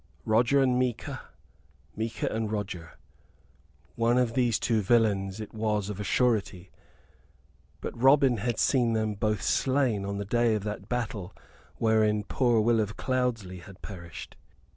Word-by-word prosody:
"Roger 120 +5 +3
and 125 -1 +2
Micah 125 -3 -2 0.7
Micah 115 +1 -3
and 110 -1 -2
Roger." 95 -7 -5 1.0
One 115 +1 +2
of 125 -2 +1
these 120 -3 +2
two 115 -2 +1
villains 100 -2 +1
it 110 - -7
was 105 -2 -1
of 100 - -7
a - - -3
surety! 100 -4 0 1.1
But - - -5
Robin 135 -2 +5
had 115 +1 -2
seen 120 -3 +2
them 110 -1 0
both 105 -2 -1
slain 130 -3 +1
on 100 0 -3
the 100 - -4
day 120 +2 +2
of 105 - -3
that 105 -1 -6
battle 105 -6 -3 0.4
wherein 110 -2 +2
poor 120 +1 +2
Will 115 +1 +3
of 105 -1 -2
Cloudesley 120 -8 -1
had 95 +2 -14
perished? 85 -5 -9
110 Hz, 145 wpm, -28 LUFS, 100-120 Hz, 1.1 s, Robin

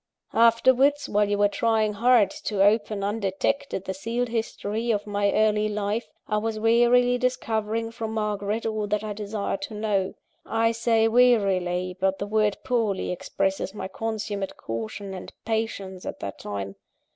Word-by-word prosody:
"Afterwards, 260 +5 +4
while 205 0 +2
you 205 - +1
were 205 0 +4
trying 220 0 +1
hard 225 -2 +4
to 200 -3 +2
open, 210 -1 +2
undetected, 200 +2 -1
the 190 - -2
sealed 230 +5 -2
history 225 0 -2
of 205 -3 +1
my 205 -1 +1
early 215 0 +2
life, 210 +2 -2 0.2
I 210 - 0
was 220 0 -2
warily 240 +2 +4
discovering 225 -3 -1
from 225 -1 -5
Margaret 210 0 -2
all 215 -2 -1
that 210 +1 -1
I 215 -1 -3
desired 210 +6 -3
to 260 -7 -6
know. 205 -3 -1 0.3
I 225 0 +1
say 230 -1 +2
'warily,' 195 -7 +3
but 190 0 +1
the 200 - -3
word 210 0 +1
poorly 225 -8 0
expresses 195 +2 -2
my 190 - -4
consummate 210 -2 -4
caution 115 - -5
and 185 - -8
patience, 210 -4 -3
at - - -5
that 100 - -6
time. 100 -1 -5
215 Hz, 155 wpm, -25 LUFS, 200-230 Hz, 0.3 s, Afterwards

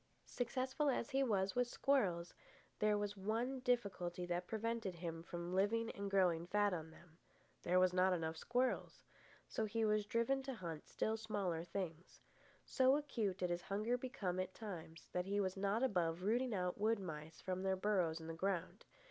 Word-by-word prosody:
Successful 260 +4 0
as 250 -1 0
he 270 0 +2
was 195 -7 +2
with 245 0 +2
squirrels, 190 -12 +1 0.5
there 210 0 +3
was 205 0 -2
one 225 +7 -1
difficulty 190 -8 0
that 175 0 -2
prevented 225 -3 -2
him 165 -1 -4
from 175 +1 -5
living 225 +4 +2
and 200 0 -4
growing 175 -4 +3
fat 205 +1 +3
on 160 -2 -4
them. 165 +1 -18 0.4
There 180 +1 +3
were 185 - +7
not 185 +1 +4
enough 165 -2 0
squirrels. 250 +9 0 0.4
So 220 - -1
he 220 +1 0
was 210 -1 +2
driven 250 +3 +2
to 265 -1 -4
hunt 165 -7 -6
still 220 +1 0
smaller 200 -7 -1
things. 175 -1 -5 0.5
So 260 0 +4
acute 225 -10 -1
did 180 -2 -1
his 175 0 -1
hunger 210 +6 0
become 210 -8 -2
at 185 0 -3
times 170 -7 -7
that 180 +1 -1
he 200 +1 +1
was 190 -2 0
not 200 +4 +1
above 180 -7 +1
rooting 235 +3 +2
out 180 0 -1
wood 220 +2 +3
mice 160 -4 -7
from 185 0 -2
their 190 0 +2
burrows 185 -5 +1
in 160 - -8
the 165 - -4
ground. 185 +1 -2
195 Hz, 180 wpm, -39 LUFS, 175-230 Hz, 0.5 s, were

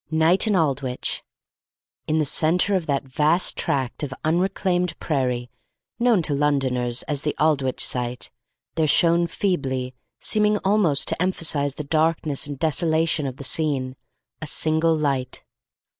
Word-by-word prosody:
Night 160 +6 +3
in 210 - +2
Aldwych! 135 -6 -1 0.9
In 155 - +1
the 155 - +1
centre 170 +7 +2
of 175 -3 -2
that 140 -2 0
vast 150 +6 +2
tract 130 -3 -2
of 145 -3 -4
unreclaimed 180 +1 0
prairie 125 -5 -2 0.5
known 235 -7 +3
to 150 - 0
Londoners 130 -4 0
as 145 -2 -2
the 150 - -2
Aldwych 140 -4 +1
Site 125 0 0 0.4
there 160 -1 +1
shone 170 +2 +3
feebly, 130 -10 -2 0.3
seeming 210 -1 +3
almost 190 -8 +2
to - - -2
emphasise 155 -6 0
the 150 - -5
darkness 155 -1 0
and 145 -1 -6
desolation 160 0 +1
of 130 -1 -6
the - - -8
scene, 135 -3 -1 0.5
a 155 - -5
single 160 +2 +1
light. 135 -4 -2
155 Hz, 140 wpm, -23 LUFS, 135-165 Hz, 0.9 s, Night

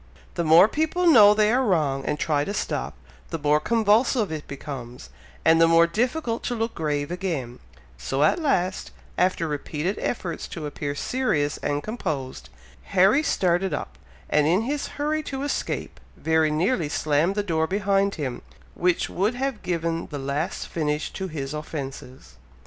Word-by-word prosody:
The 170 - -1
more 165 +4 +7
people 315 +7 0
know 210 -11 +8
they 215 0 +3
are 255 +2 +2
wrong, 150 - +1
and 150 - -1
try 150 -2 0
to 200 +6 -4
stop, 65 - -3 0.3
the - - -3
more 150 0 +2
convulsive 225 - +2
it 155 -2 -5
becomes, 125 - -8 0.3
and 165 0 +5
the 165 - +7
more 165 0 +6
difficult 235 - -1
to 245 - -1
look 225 0 -2
grave 145 -1 -2
again, 160 -10 -3 0.4
so 135 - 0
at 155 - +3
last, 190 - 0 0.3
after 180 -2 +1
repeated 150 +5 -3
efforts 175 -8 -3
to 160 - -6
appear 145 -1 -4
serious 150 - 0
and 145 0 -2
composed, 155 - -4 0.5
Harry 195 +10 +6
started 185 - +1
up, 65 - -7 0.3
and 150 -1 +2
in 180 +7 +3
his 285 +4 -2
hurry 305 +1 0
to 270 -2 -5
escape, 285 - -3 0.2
very 160 -1 +2
nearly 165 - 0
slammed 155 +6 +1
the 205 - 0
door 160 -4 0
behind 200 +1 +1
him, 130 -5 -4 0.3
which 180 0 +1
would 205 +6 -1
have 265 -3 -2
given 170 -1 -2
the 145 - -6
last 140 +4 -3
finish 150 -2 -2
to 190 - -4
his 145 -4 -5
offences. 135 -4 -7
165 Hz, 160 wpm, -24 LUFS, 150-210 Hz, 0.5 s, know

